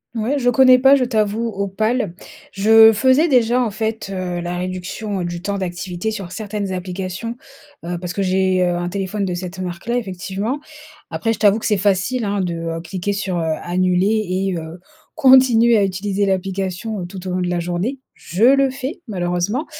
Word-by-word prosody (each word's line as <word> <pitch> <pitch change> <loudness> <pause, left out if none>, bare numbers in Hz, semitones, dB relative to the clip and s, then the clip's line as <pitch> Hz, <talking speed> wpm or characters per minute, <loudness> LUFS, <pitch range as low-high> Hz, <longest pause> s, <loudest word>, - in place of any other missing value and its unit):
Ouais, 235 +6 0
je 245 -2 +2
connais 255 0 +6
pas 270 +2 +6
je 255 - +1
t'avoue 220 -1 0
Opal. 210 0 -1 0.4
Je 220 +2 +7
faisais 260 +9 +3
déjà, 245 -2 +3
en 225 - -2
fait, 220 0 -3
heu, 180 -2 -3
la 175 +1 -4
réduction 185 +2 -4
du 175 0 -4
temps 200 +2 -2
d'activité 180 +2 -4
sur 195 -4 -6
certaines 205 -2 -4
applications, 185 +5 -5 0.5
heu, 175 +1 -3
parce 175 0 -5
que 200 - -3
j'ai, 185 -1 +1
heu, 175 -1 +1
un 175 0 -2
téléphone 200 +2 -3
de 185 -2 -2
cette 180 +1 -6
marque-là 185 +6 -4
effectivement. 200 +3 -3 0.5
Après 225 - -1
je 220 - -3
t'avoue 210 0 +4
que - - -7
c'est 210 -2 +2
facile, 205 +5 0
hein, 200 -1 -1
de, 175 -2 -2
heu, 165 0 -4
cliquer 185 +4 -3
sur, 195 -3 -2
heu, 160 -1 0
«annuler» 185 +4 +1
et 185 0 -1
heu, 165 +2 -8 0.3
continuer 255 -5 +6
à 205 - +3
utiliser 195 +1 -1
l'application, 195 +2 -2
heu, - - -4
tout 185 0 -9
au - - -3
long 185 - -1
de 180 - -1
la 175 -1 -1
journée. 180 +10 -3
Je 180 +6 -4
le 275 +2 +5
fais, 275 +6 -6
malheureusement 180 - -1
195 Hz, 190 wpm, -19 LUFS, 180-225 Hz, 0.5 s, Je